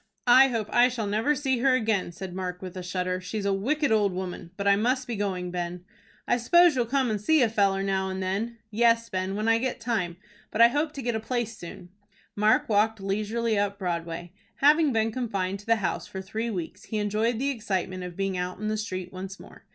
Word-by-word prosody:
"I 255 Hz, +2 st, +8 dB
hope 225 Hz, -5 st, -2 dB
I 245 Hz, +1 st, +6 dB
shall 240 Hz, -3 st, -3 dB
never 220 Hz, +9 st, +1 dB
see 265 Hz, -3 st, 0 dB
her 260 Hz, +1 st, +4 dB
again," 220 Hz, -7 st, 0 dB
said 180 Hz, +1 st, -7 dB
Mark, 180 Hz, -1 st, -4 dB
with 185 Hz, -1 st, -7 dB
a 185 Hz, -, -5 dB
shudder. 180 Hz, 0 st, -2 dB
"She 185 Hz, +4 st, -5 dB
is 205 Hz, -, -3 dB
a 200 Hz, -, +2 dB
wicked 280 Hz, +8 st, 0 dB
old 205 Hz, -3 st, +3 dB
woman. 180 Hz, -2 st, -5 dB
But 200 Hz, 0 st, -2 dB
I 200 Hz, -, +6 dB
must 250 Hz, +5 st, +1 dB
be 240 Hz, -, -4 dB
going, 185 Hz, -3 st, -2 dB
Ben." 175 Hz, 0 st, -4 dB, 0.4 s
"I 245 Hz, -, +3 dB
s'pose 345 Hz, +6 st, +5 dB
you'll 245 Hz, -2 st, +1 dB
come 260 Hz, -1 st, +1 dB
and 210 Hz, -2 st, -2 dB
see 305 Hz, +6 st, +4 dB
a 230 Hz, -, +3 dB
feller 195 Hz, -3 st, +2 dB
now 190 Hz, -1 st, 0 dB
and 190 Hz, 0 st, -4 dB
then." 200 Hz, +5 st, -2 dB
"Yes, 230 Hz, +1 st, +3 dB
Ben, 185 Hz, +1 st, -2 dB
when 215 Hz, +2 st, -1 dB
I 225 Hz, 0 st, +4 dB
get 255 Hz, 0 st, -2 dB
time. 215 Hz, -8 st, -2 dB, 0.3 s
But 215 Hz, -, -5 dB
I 235 Hz, 0 st, +9 dB
hope 295 Hz, +4 st, -1 dB
to 275 Hz, -, -6 dB
get 240 Hz, 0 st, 0 dB
a 220 Hz, -, -1 dB
place 230 Hz, 0 st, -3 dB
soon." 175 Hz, -2 st, -10 dB, 0.5 s
Mark 210 Hz, +1 st, +3 dB
walked 220 Hz, +1 st, +2 dB
leisurely 215 Hz, +3 st, -1 dB
up 200 Hz, 0 st, -1 dB
Broadway. 170 Hz, -2 st, -4 dB, 0.2 s
Having 300 Hz, +1 st, +4 dB
been 225 Hz, -1 st, +1 dB
confined 200 Hz, -6 st, -2 dB
to 205 Hz, -, -14 dB
the 230 Hz, -, +5 dB
house 205 Hz, -5 st, -2 dB
for 190 Hz, -, -7 dB
three 220 Hz, +5 st, -3 dB
weeks, 180 Hz, -7 st, -5 dB
he 220 Hz, -, -3 dB
enjoyed 215 Hz, +3 st, 0 dB
the 275 Hz, +4 st, 0 dB
excitement 190 Hz, -6 st, -3 dB
of 180 Hz, -1 st, -8 dB
being 195 Hz, -1 st, -1 dB
out 180 Hz, 0 st, -3 dB
in 215 Hz, +1 st, -3 dB
the 215 Hz, -, -1 dB
street 185 Hz, -4 st, -5 dB
once 190 Hz, +1 st, -7 dB
more. -, -, -15 dB
210 Hz, 230 wpm, -27 LUFS, 190-235 Hz, 0.5 s, I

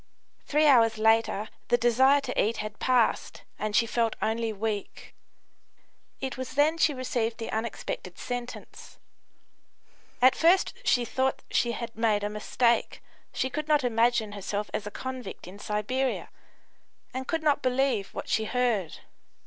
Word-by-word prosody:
Three 300 Hz, +1 st, +2 dB
hours 230 Hz, -6 st, +5 dB
later 220 Hz, -1 st, +2 dB, 0.2 s
the 240 Hz, -, +3 dB
desire 260 Hz, +4 st, +4 dB
to -, -, 0 dB
eat 220 Hz, +2 st, -1 dB
had 215 Hz, 0 st, -6 dB
passed, 250 Hz, -3 st, +1 dB, 0.2 s
and 215 Hz, -1 st, -2 dB
she 230 Hz, -, +4 dB
felt 230 Hz, -1 st, 0 dB
only 225 Hz, 0 st, -1 dB
weak. 210 Hz, -1 st, -4 dB, 1.1 s
It 265 Hz, 0 st, -4 dB
was 260 Hz, -, -5 dB
then 310 Hz, +3 st, +3 dB
she 310 Hz, -, +4 dB
received 240 Hz, -3 st, -2 dB
the 225 Hz, -, -5 dB
unexpected 220 Hz, -5 st, -4 dB
sentence. 245 Hz, 0 st, -7 dB, 1.2 s
At 255 Hz, +1 st, +6 dB
first 345 Hz, +4 st, +3 dB
she 245 Hz, -1 st, +2 dB
thought 260 Hz, +3 st, -1 dB
she 235 Hz, -1 st, +1 dB
had 235 Hz, -1 st, -6 dB
made 215 Hz, -2 st, +1 dB
a 205 Hz, -, -1 dB
mistake; 235 Hz, +3 st, 0 dB, 0.3 s
she 260 Hz, -, -2 dB
could 305 Hz, +2 st, -3 dB
not 300 Hz, -2 st, +3 dB
imagine 230 Hz, -2 st, +2 dB
herself 205 Hz, +1 st, -4 dB
as 210 Hz, -, -3 dB
a -, -, -3 dB
convict 255 Hz, -1 st, -7 dB
in 190 Hz, +3 st, -11 dB
Siberia, 230 Hz, +6 st, -2 dB, 0.8 s
and 260 Hz, 0 st, -4 dB
could 325 Hz, -1 st, -1 dB
not 295 Hz, -2 st, +2 dB
believe 255 Hz, -5 st, +1 dB
what -, -, -5 dB
she 220 Hz, -, +1 dB
heard. 230 Hz, -8 st, -1 dB
235 Hz, 150 wpm, -27 LUFS, 215-260 Hz, 1.2 s, At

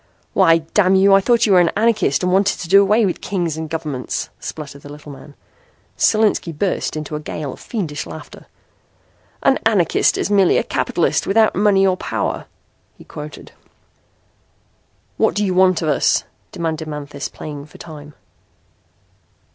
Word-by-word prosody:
"Why, 165 Hz, -4 st, +5 dB, 0.2 s
damn 190 Hz, -2 st, +4 dB
you, 195 Hz, +1 st, +5 dB
I 195 Hz, -, +6 dB
thought 235 Hz, +2 st, +3 dB
you 205 Hz, -, +3 dB
were 185 Hz, -, +7 dB
an 175 Hz, -2 st, +4 dB
anarchist 215 Hz, -9 st, +1 dB
and 180 Hz, 0 st, +1 dB
wanted 195 Hz, +1 st, +2 dB
to 180 Hz, -, -6 dB
do 195 Hz, +3 st, +6 dB
away 210 Hz, +3 st, +3 dB
with 185 Hz, -, -2 dB
kings 175 Hz, -5 st, -2 dB
and 160 Hz, 0 st, -5 dB
governments," 150 Hz, -6 st, -4 dB
sputtered 145 Hz, -2 st, -8 dB
the 145 Hz, -, -11 dB
little 150 Hz, 0 st, -11 dB
man. 140 Hz, +1 st, -13 dB, 0.6 s
Solinski 215 Hz, -5 st, +2 dB
burst 190 Hz, -2 st, -1 dB
into 155 Hz, 0 st, -5 dB
a -, -, -3 dB
gale 150 Hz, -2 st, -6 dB
of -, -, -14 dB
fiendish 165 Hz, -11 st, -4 dB
laughter. 80 Hz, -1 st, -11 dB, 1.0 s
"An -, -, +3 dB
anarchist -, -, +2 dB
is -, -, -2 dB
merely 195 Hz, -3 st, +4 dB
a -, -, +1 dB
capitalist -, -, -1 dB
without 220 Hz, +2 st, +3 dB
money 195 Hz, 0 st, +3 dB
or 185 Hz, -1 st, +2 dB
power," -, -, -3 dB, 0.5 s
he -, -, -14 dB
quoted. 150 Hz, 0 st, -10 dB, 1.7 s
"What -, -, +2 dB
do 205 Hz, 0 st, +1 dB
you 185 Hz, -, 0 dB
want 185 Hz, -2 st, +3 dB
of 155 Hz, -, 0 dB
us?" 145 Hz, -, +2 dB, 0.3 s
demanded 160 Hz, -2 st, -4 dB
Manthis, 145 Hz, -2 st, -6 dB
playing 145 Hz, -1 st, -8 dB
for -, -, -16 dB
time. 150 Hz, -3 st, -11 dB
175 Hz, 165 wpm, -19 LUFS, 150-195 Hz, 1.7 s, were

